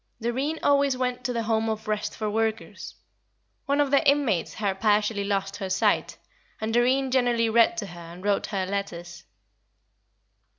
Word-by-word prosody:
Doreen 260 +7 -2
always 280 -2 +3
went 250 -1 -2
to 250 - 0
the 230 -1 -2
Home 225 0 0
of 220 0 -4
Rest 210 -1 -2
for 215 - -2
Workers. 220 +1 -3 0.7
One 280 +1 +1
of 285 -2 +2
the 280 - +4
inmates 275 - +1
had 195 -3 -2
partially 210 -1 +2
lost 200 0 -2
her 195 -2 -4
sight, 190 - +1 0.4
and 220 +1 -3
Doreen 255 +3 +2
generally 240 -3 +2
read 230 0 +4
to 220 - -2
her 175 -3 -10
and 170 +2 -11
wrote 205 -1 +1
her 195 -2 -2
letters. 175 -3 -5
220 Hz, 165 wpm, -26 LUFS, 200-250 Hz, 0.7 s, the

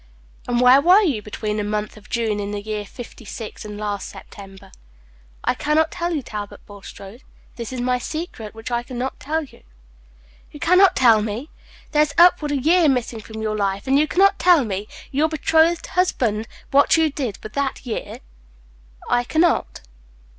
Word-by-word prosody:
"And 240 -1 +1
where 250 +2 +7
were 365 +7 +6
you 275 - 0
between 210 0 -4
the 210 - -1
month 210 0 -3
of 215 -1 -16
June 225 -3 -1
in 200 0 -3
the 205 0 -3
year 210 -1 -4
fifty 240 +2 -11
six 215 +1 -8
and 210 -1 -8
last 205 -1 -4
September?" 195 -2 -13 0.7
"I - - +2
can 300 +1 -1
not 320 0 +3
tell 345 0 -3
you, 300 -5 -2
Talbot 210 -3 -7
Bulstrode. 200 +2 -12 0.3
This 235 -1 -6
is 255 -1 -4
my 250 0 0
secret, 245 -7 -6
which 225 +2 -8
I 240 0 0
can 245 0 -9
not 260 +2 -4
tell 315 +3 -2
you." 275 - -15 0.9
"You 295 - -11
can 350 +3 +4
not 385 -2 +6
tell 230 -4 +5
me! 220 +8 -5 0.4
There 300 - +3
is 295 -1 0
upward 340 -4 +5
of 290 - +1
a - - -3
year 335 0 +4
missing 245 -3 -1
from 220 +1 -8
your 215 -1 -1
life, 200 0 -1
and 270 +1 +3
you 305 - +2
can - - -8
not 395 +1 +5
tell 345 -7 +5
me, 205 0 -4 0.2
your 295 +3 +1
betrothed 320 +2 +2
husband, 235 - 0 0.2
what 280 +3 +5
you 320 -2 +2
did 255 -8 -4
with 215 - -8
that 275 -1 -2
year?" 235 - -5 0.9
"I 245 - +2
can 315 +6 0
not." 345 -1 +1
250 Hz, 195 wpm, -21 LUFS, 215-310 Hz, 0.9 s, where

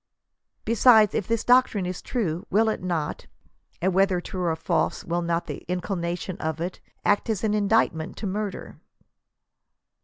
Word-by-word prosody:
Besides, 220 -2 +5
if 205 - -1
this 230 -1 0
doc 250 +1 +6
trine 200 -4 -3
is 180 0 -4
true, 180 -9 -2
will 220 +3 +3
it 220 - -2
not 170 -5 -3 0.3
— - - -40
and 190 0 +2
whether 190 -1 +3
true 185 +1 -6
or 170 -2 +1
false, 160 - -1
will 170 +1 -1
not 170 0 -1
the - - -7
inculcation 180 0 -3
of 160 0 -3
it 175 +2 -4 0.2
— - - -39
act 205 +3 +2
as 215 -3 -1
an 215 -1 +1
inducement 205 -6 +1
to - - -5
murder 200 0 -4
185 Hz, 175 wpm, -25 LUFS, 170-215 Hz, 0.3 s, doc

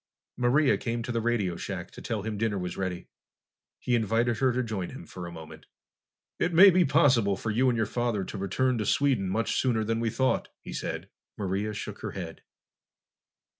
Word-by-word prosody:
Maria 130 +4 +3
came 115 0 -2
to 120 - -4
the 115 -1 0
radio 110 -7 0
shack - - -5
to - - -11
tell 110 -3 -3
him 110 0 -3
dinner 105 -1 0
was 90 -1 -4
ready. 95 -2 -4 0.7
He 125 - -2
invited 115 +1 +2
her 130 -1 +3
to 125 +1 0
join 105 -6 -3
him - - -9
for 90 +1 -8
a - - -8
moment. 80 -2 -11 0.7
"It 170 -1 0
may 190 +3 +10
be 180 0 +4
possible 130 - +3
for 110 - -3
you 130 +5 +3
and 120 - +1
your 110 - +2
father 120 -2 -1
to - - -6
return 120 +6 0
to 105 - -1
Sweden 130 -10 +2
much 115 +4 0
sooner 120 -4 +1
that 115 +1 -1
we 115 -1 0
thought," 130 +4 +1 0.2
he - - -7
said. - - -4 0.3
Maria 100 +2 -1
shook - - -6
her - - -5
head. - - -7
115 Hz, 200 wpm, -28 LUFS, 100-125 Hz, 0.7 s, may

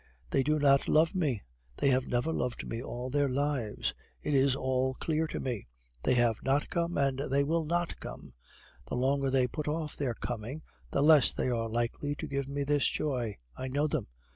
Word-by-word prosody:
They - - +3
do 150 +3 +2
not 140 -2 +4
love 160 +3 +4
me 145 - 0 0.3
they 140 - +3
have 130 -1 +2
never 125 +7 0
loved 125 -4 -2
me 115 - -3
all 125 0 -5
their 145 0 +2
lives! 135 -5 -1 0.3
It 150 - -1
is 135 -1 +4
all 130 -1 0
clear 160 +2 0
to - - -4
me. 120 -6 -3 0.3
They - - +2
have 120 -3 +3
not 135 +2 +1
come, 170 0 0
and 135 -2 +1
they 140 +1 +3
will 160 +2 0
not 175 +2 -1
come. - - -9 0.5
The - - -3
longer 135 +2 +1
they 130 -1 +3
put 150 +4 -4
off 155 0 -2
their 130 -5 -1
coming, 120 +7 -5 0.3
the 140 - +1
less 155 -2 +6
they - - -1
are 115 -2 -1
likely 120 +5 -1
to - - -5
give 140 0 -3
me 140 0 -1
this 145 0 +2
joy. 125 -8 -1 0.2
I 130 - -4
know 145 +3 +1
them. 150 -7 -1
135 Hz, 200 wpm, -31 LUFS, 125-150 Hz, 0.5 s, less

